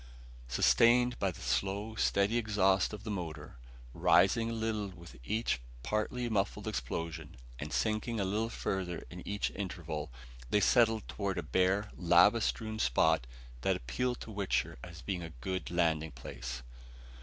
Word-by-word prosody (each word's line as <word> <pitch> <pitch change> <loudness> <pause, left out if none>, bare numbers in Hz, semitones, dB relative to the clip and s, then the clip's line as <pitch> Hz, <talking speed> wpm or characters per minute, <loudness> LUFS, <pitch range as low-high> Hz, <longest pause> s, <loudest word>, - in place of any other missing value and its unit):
Sustained 115 - +4
by 100 - +2
the 90 - -8
slow, 95 - -1
steady 105 +1 +2
exhaust 100 -4 +2
of 105 -1 -7
the 110 - -4
motor, 80 -9 -6 0.3
rising 115 - +4
a - - -2
little 110 -2 -1
with 85 -6 -12
each 110 - 0 0.2
partly 120 - -1
muffled 100 -4 -1
explosion 80 +3 -4 0.2
and 75 +1 -5
sinking 110 +5 0
a 100 - +1
little 105 +4 0
further 95 -6 -3
in 90 0 -8
each 105 0 -1
interval, 85 -7 -5 0.4
they 105 - +3
settled 110 +1 +4
toward 100 -2 -2
a - - -1
bare, 95 +3 +1
lava 90 +6 +5
strewn 110 0 -2
spot - - +3 0.3
that - - +2
appealed 125 - -2
to 115 - -7
Wichter 90 - -1
as 85 -2 -10
being 95 -3 -2
a 80 - -6
good 95 +7 -3
landing 80 -3 +1
place. - - -7
95 Hz, 150 wpm, -32 LUFS, 80-110 Hz, 0.4 s, lava